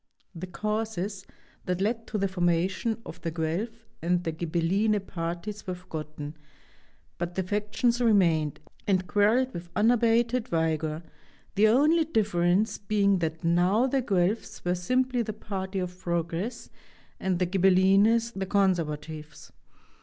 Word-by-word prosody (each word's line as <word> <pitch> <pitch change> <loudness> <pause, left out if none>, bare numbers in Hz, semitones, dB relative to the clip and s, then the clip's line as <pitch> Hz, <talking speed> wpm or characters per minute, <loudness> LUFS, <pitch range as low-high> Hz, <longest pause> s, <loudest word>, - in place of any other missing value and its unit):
The 180 +1 -6
causes 210 0 -3 0.4
that 180 0 -1
led 225 +3 -1
to 215 - -2
the 195 -1 +1
formation 185 +4 0
of - - -9
the 165 - -2
Guelph 180 +9 -3 0.2
and 175 +2 +1
the 165 - -1
Ghibelline 175 +6 +1
parties 175 +4 -5
were 185 - -2
forgotten, 155 -4 -7 0.8
but 175 0 -3
the 190 - 0
factions 210 +5 0
remained, 170 - +3 0.3
and 185 -2 +2
quarreled 225 +7 +2
with 170 0 -7
unabated 235 +1 +3
vigor, 160 -1 -1 0.5
the 210 +2 +4
only 300 +9 +4
difference 205 - +1
being 200 -2 +2
that 160 0 -3
now 180 +8 +3
the 265 0 +1
Guelphs 195 -2 -1
were 175 - +2
simply 250 +7 +1
the 215 -2 -3
party 195 -2 -5
of 180 -1 -4
progress 170 +6 -3 0.5
and 190 -2 0
the 180 - +1
Ghibellines 195 +5 +4
the 190 -1 -3
conservatives. 160 -6 -1
190 Hz, 130 wpm, -27 LUFS, 170-220 Hz, 0.8 s, the